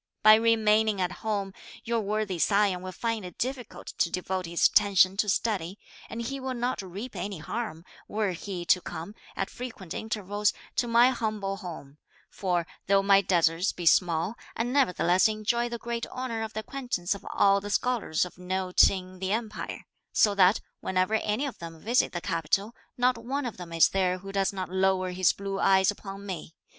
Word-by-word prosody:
By 215 0 +9
remaining 220 -2 +3
at 180 -1 0
home, 200 -3 -2 0.3
your 235 -1 0
worthy 205 -3 -2
scion 200 -1 +2
will 185 0 -6
find 230 +1 -2
it 180 -2 -9
difficult 255 -2 -5
to 170 - +3
devote 185 0 -3
his 170 0 +1
attention 195 -2 +5
to 210 0 +1
study; 195 -3 -1 0.3
and 230 +2 -5
he 275 +4 -4
will 260 -1 -4
not 245 0 -1
reap 200 +6 -7
any 195 +1 -4
harm, 170 -1 -5 0.2
were 210 -2 -1
he 180 0 -5
to 180 +2 +4
come, 170 +5 -7 0.2
at - - -3
frequent 220 -8 -7
intervals, 210 -1 -1 0.2
to 240 - +1
my 235 +2 +5
humble 215 -5 -2
home; 155 -6 -9 0.3
for 175 -3 -1 0.2
though 195 0 +4
my 195 0 +6
deserts 175 0 +2
be 175 - -6
small, 170 +3 +3 0.2
I 230 - 0
nevertheless 190 -8 +3
enjoy 220 +3 0
the 235 - -4
great 235 0 -4
honour 255 -3 -4
of 220 -1 -5
the 220 - -3
acquaintance 245 -8 -2
of 200 - -9
all 200 0 +4
the 205 - -6
scholars 215 -8 0
of 180 - -12
note 185 0 +3
in 185 -1 -6
the 190 +1 -2
Empire, 220 -1 -4 0.3
so 210 - +4
that, 195 +1 +4 0.2
whenever 185 +3 0
any 220 +4 0
of 275 - -6
them 165 -1 -8
visit 235 +8 +2
the 175 - -4
capital, 185 +6 -1 0.2
not 250 -1 +2
one 270 +3 -2
of 240 - -5
them 175 -2 -9
is 165 -1 +5
there 185 -1 +1
who 195 +1 -9
does 195 -1 +1
not 190 -2 -4
lower 190 0 +1
his 185 0 +3
blue 195 0 -5
eyes 190 0 +4
upon 200 -1 -9
me. 180 -4 -6
200 Hz, 185 wpm, -28 LUFS, 185-225 Hz, 0.3 s, By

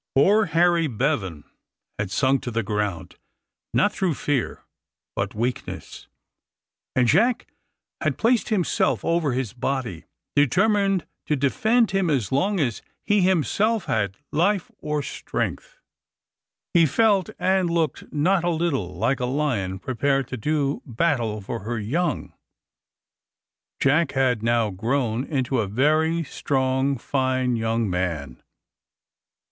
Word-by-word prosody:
Poor 205 +10 +5
Harry 170 0 +3
Bevan 95 - -1 0.6
had 105 -2 -1
sunk 130 +7 +2
to - - -4
the 115 -1 -1
ground, 105 -3 -3 0.5
not 205 - +2
through 180 -6 0
fear, 140 -3 -2 0.5
but 100 +1 -2
weakness; 120 +3 -4 0.9
and 125 -1 +3
Jack 235 - +3 0.6
had - - 0
placed 235 +1 +2
himself 200 -6 +1
over 165 -5 +1
his 125 -3 -2
body, 125 -8 -3 0.3
determined 195 - +3 0.2
to 150 - +2
defend 220 - +2
him 195 -3 +1
as 130 -10 0
long 190 +9 +1
as 120 -7 -1 0.2
he 205 -1 +2
himself 190 +5 +1
had 100 -3 -1
life 180 +4 +1
or 150 -1 -2
strength. - - -4 1.0
He 170 -3 +5
felt 200 +3 +2
and 190 -2 +2
looked 165 -2 -1
not 175 +5 +2
a 175 - +1
little 150 - -1
like 130 +9 0
a 125 - 0
lion 125 -9 -1
prepared 135 +4 0
to - - -4
do 145 +3 -1
battle 120 -5 -1
for 115 +4 -5
her 115 +4 -4
young. 155 +12 -2 1.5
Jack 145 +3 +2
had 130 -4 +1
now 115 -2 +1
grown 115 +4 -1
into 130 -3 -1
a 105 - 0
very 155 +9 +2
strong 135 -1 0
fine 130 -1 0
young 115 0 0
man. 85 -8 -3
135 Hz, 125 wpm, -24 LUFS, 115-170 Hz, 1.5 s, Poor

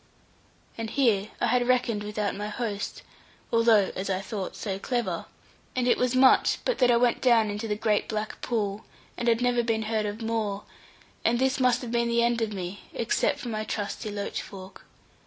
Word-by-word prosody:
And 225 -1 -3
here 225 -6 +2
I - - +2
had 245 +1 +2
reckoned 245 -4 +2
without 210 0 -2
my 210 +1 -4
host, 210 -2 -4 0.5
although 230 -4 +4
(as 190 +1 -3
I 190 -1 0
thought) 195 -1 -5
so 195 -3 -4
clever; 240 +2 -2 0.5
and 250 -1 +1
it 245 - +3
was 250 0 +1
much 260 0 +5
but - - 0
that 250 -2 +5
I 240 - +5
went 240 0 +2
down 230 -4 +4
into 210 +2 -4
the 210 - 0
great 215 -1 +1
black 215 -1 -4
pool, 210 -3 -2 0.3
and 240 - -3
had 230 0 +3
never 245 -1 +2
been 225 -1 0
heard 215 -1 -1
of 205 +1 -5
more; 215 -3 -2 0.6
and 235 +1 +3
this 265 +2 +1
must 250 -1 +3
have 235 - -5
been 235 0 +1
the 235 0 +3
end 235 0 +1
of 220 -1 0
me, 190 0 -5
except 230 - +1
for 245 - -6
my 215 -1 -2
trusty 210 +1 -4
loach 205 -1 -3
fork. 190 -1 -11
225 Hz, 195 wpm, -27 LUFS, 210-240 Hz, 0.6 s, much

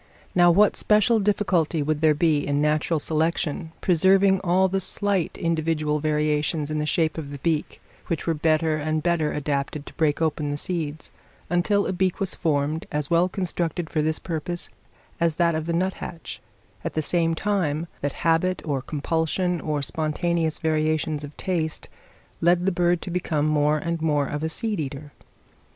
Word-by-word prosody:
Now 175 -1 +6
what 200 +5 +5
special 215 +2 +3
difficulty 185 -6 +1
would 150 +1 -1
there 155 -1 +4
be 155 -1 +3
in 145 0 -1
natural 150 +2 +1
selection 160 0 -1
preserving 190 +2 +4
all 185 +1 +3
the 190 +1 -1
slight 200 -1 -1
individual 160 -2 0
variations 150 0 0
in 155 - -1
the 150 - -1
shape 160 0 +1
of 145 -3 -6
the 140 - -6
beak, 155 +1 -1 0.3
which 165 - -2
were 165 - +1
better 155 0 +1
and 155 +1 -1
better 170 -3 +1
adapted 140 0 -2
to - - -11
break 150 -2 +1
open 155 -2 0
the 145 - -2
seeds, 160 -2 -4 0.4
until 200 +3 +2
a - - -1
beak 185 0 0
was 195 - 0
formed, 155 -1 -1
as 150 +1 -2
well 170 +2 +4
constructed 175 -3 -3
for 155 - +1
this 155 +1 0
purpose 175 0 -4 0.5
as 170 -2 +2
that 170 0 +2
of 155 0 -3
the - - 0
nuthatch, 175 -1 -3 0.4
at - - -4
the 155 - 0
same 165 0 +1
time 170 -5 0 0.2
that 145 -1 -1
habit, 165 +3 +2
or 140 -4 -1
compulsion, 160 +5 -1
or 150 -2 -2
spontaneous 160 +2 0
variations 155 -1 0
of 145 0 -9
taste, 165 -5 -2 0.5
led 175 +1 +3
the 195 - +3
bird 175 -1 +1
to 180 - -5
become 160 -4 0
more 150 0 +2
and 170 +1 -3
more 150 -3 +2
of 145 +1 -4
a 160 - -1
seed 215 +3 -2
eater? 145 0 -5
160 Hz, 170 wpm, -24 LUFS, 150-175 Hz, 0.5 s, Now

